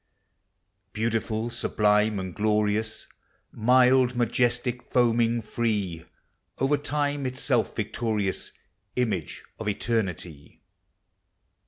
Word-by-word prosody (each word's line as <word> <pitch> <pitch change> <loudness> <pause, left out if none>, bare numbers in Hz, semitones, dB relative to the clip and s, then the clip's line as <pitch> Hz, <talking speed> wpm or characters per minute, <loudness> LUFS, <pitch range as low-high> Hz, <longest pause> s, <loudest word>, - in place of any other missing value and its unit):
Beautiful, 115 +1 -1
sublime, 105 -2 +2
and 95 -2 -4
glorious; 105 +1 0 0.5
Mild, 125 +2 +4
majestic, 120 +1 0
foaming, 120 -1 +2
free, 105 -7 -2 0.5
Over 135 +3 +2
lime 145 -2 0
itself 130 -2 0
victorious, 105 -2 -1 0.4
Image 105 -10 -2 0.2
of 110 - -5
eternity 95 -9 -3
115 Hz, 75 wpm, -26 LUFS, 105-125 Hz, 0.5 s, Mild